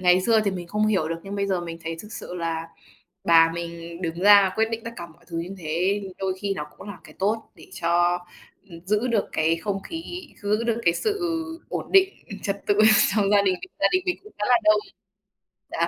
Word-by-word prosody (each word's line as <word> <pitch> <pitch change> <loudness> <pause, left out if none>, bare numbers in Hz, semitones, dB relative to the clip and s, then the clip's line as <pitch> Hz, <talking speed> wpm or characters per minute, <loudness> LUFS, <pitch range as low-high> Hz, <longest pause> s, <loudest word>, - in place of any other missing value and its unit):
ngày 180 0 +5
xưa 225 0 +4
thì 200 - +2
mình 180 -2 -6
không 210 +3 +1
hiểu 190 -7 +1
được, 165 0 -4
nhưng 200 +1 -5
bây 200 0 0
giờ 190 -2 0
mình 165 -1 -7
thấy 165 0 -3
thực 210 0 -12
sự - - -7
là 165 -1 -3 0.6
bà 165 -1 +6
mình 170 0 -7
đứng 170 0 -3
ra 200 -2 +7
quyết 220 0 +2
định 225 0 -4
tất 230 - -4
cả 170 - -6
mọi 170 +1 -21
thứ 165 -2 -4
như 180 +4 -5
thế, 180 +5 0 0.2
đôi 190 -1 -1
khi 200 -1 -1
nó 150 - -4
cũng 190 - -10
là 200 - -8
cái - - -14
tốt, 215 +3 -1
để - - -15 0.2
cho, 175 +1 +3 0.5
ừm, 165 -1 -10
giữ 210 +5 +1
được 225 -4 +1
cái 160 +1 +2
không 195 +2 -3
khí, 335 +1 -7
giữ 210 +3 0
được 230 0 0
cái 170 0 +4
sự 415 -2 -1 0.5
ổn - - -5
định 390 0 +5 0.3
trật 200 0 -3
tự 205 - +3 0.4
trong 200 -2 +2
gia 205 -1 +5
đình, 190 -2 +2 0.3
gia - - +5
đình 370 0 +2
mình 360 - +1
cũng 425 - -14
khá 210 - -1
là 245 -1 +6
đông. 215 0 +5 0.9
Đó. - - 0
195 Hz, 230 wpm, -24 LUFS, 170-215 Hz, 0.9 s, ra